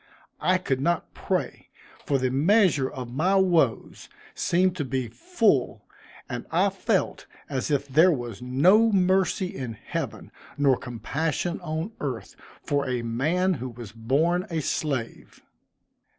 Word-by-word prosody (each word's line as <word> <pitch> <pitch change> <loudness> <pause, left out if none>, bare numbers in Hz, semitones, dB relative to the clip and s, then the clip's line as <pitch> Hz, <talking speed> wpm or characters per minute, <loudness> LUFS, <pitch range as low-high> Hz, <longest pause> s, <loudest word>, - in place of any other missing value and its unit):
I 185 0 +3
could 135 -8 -2
not 170 +3 -1
pray, - - -3 0.4
for 140 - +2
the 130 -1 0
measure 155 - +3
of 125 -2 -7
my 180 +8 +2
woes 170 - +1 0.2
seemed 180 +1 +1
to 150 - -1
be 130 -2 -2
full, 230 - 0 0.4
and - - -6
I - - +2
felt - - -1 0.2
as 135 0 -3
if 145 -1 0
there 160 +7 +5
was 120 - -4
no 180 - +4
mercy 190 0 +1
in 125 -4 -5
heaven, 110 - -6 0.3
nor 140 -2 +4
compassion 150 - -3
on 160 +4 -3
earth, 130 -6 -5 0.3
for 140 -2 -1
a 125 -2 -1
man 155 +11 +1
who 130 - -4
was 120 -3 -10
born 150 - 0
a 165 -2 -1
slave. 135 -5 -3
145 Hz, 135 wpm, -26 LUFS, 130-180 Hz, 0.4 s, there